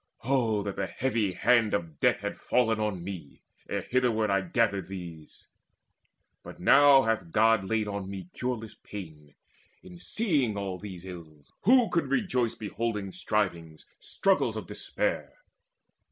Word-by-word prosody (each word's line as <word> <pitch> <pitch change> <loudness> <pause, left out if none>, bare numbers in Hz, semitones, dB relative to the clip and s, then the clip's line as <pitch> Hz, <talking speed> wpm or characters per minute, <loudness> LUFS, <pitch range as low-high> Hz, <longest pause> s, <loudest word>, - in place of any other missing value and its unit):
Oh 115 -5 +1
that 100 -1 -5
the 95 - -1
heavy 115 -7 -1
hand 115 +3 +3
of 85 -6 -5
death - - +3
had - - -4
fallen 115 -3 +1
On 105 -5 -2
me, 90 -7 -8 0.3
ere - - -2
hitherward 115 -4 +1
I 100 0 +3
gathered 100 +1 0
these! 85 -5 -9 1.0
But - - -11
now 140 -1 +7
hath 110 -7 -1
God 110 -1 +4
laid 110 +1 0
on 100 -2 -4
me 95 -3 -7
cureless 120 -3 -4
pain 75 -7 -10 0.5
In 175 -1 -12
seeing 150 - 0
all 95 -2 -4
these 95 -3 -8
ills. 80 -5 -11
Who 245 +1 +6
could 170 - 0
rejoice 130 - 0
Beholding 105 -2 -3
strivings, 85 -7 -2
struggles 195 -1 +1
of - - -5
despair? - - -3
105 Hz, 140 wpm, -28 LUFS, 95-120 Hz, 1.0 s, now